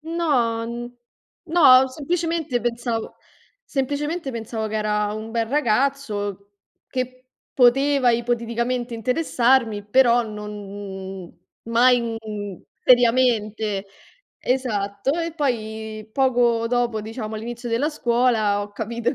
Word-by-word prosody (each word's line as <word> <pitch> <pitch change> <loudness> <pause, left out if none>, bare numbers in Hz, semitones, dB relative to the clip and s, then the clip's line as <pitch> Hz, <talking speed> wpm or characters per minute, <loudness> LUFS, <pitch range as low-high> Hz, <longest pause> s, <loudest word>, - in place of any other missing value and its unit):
No, 290 -9 0 0.8
no, 285 -6 +6
semplicemente 320 -1 -2
pensavo 235 -1 -2 0.5
semplicemente 290 +3 -2
pensavo 225 -1 -4
che 215 - -6
era 210 -1 0
un 215 +1 -6
bel 230 0 0
ragazzo 220 -6 -1 0.4
che 255 0 -4 0.3
poteva 270 +1 +4
ipoteticamente 235 +1 -1
interessarmi, 240 -3 +1
però 240 +2 +4
non 200 -3 -7 0.3
mai, 245 +2 +4
mhmm, 215 -5 -5 0.2
seriamente. 225 -5 +3 0.5
Esatto, 215 -3 -1
e 335 0 -2
poi 220 -6 -3
poco 240 -3 +2
dopo, 240 -2 0
diciamo, 220 0 -6
all'inizio 240 +2 -6
della 235 +6 +1
scuola, 235 -6 +1
ho 205 - -8
capito 230 +3 -2
che - - -4
235 Hz, 100 wpm, -23 LUFS, 215-255 Hz, 0.8 s, no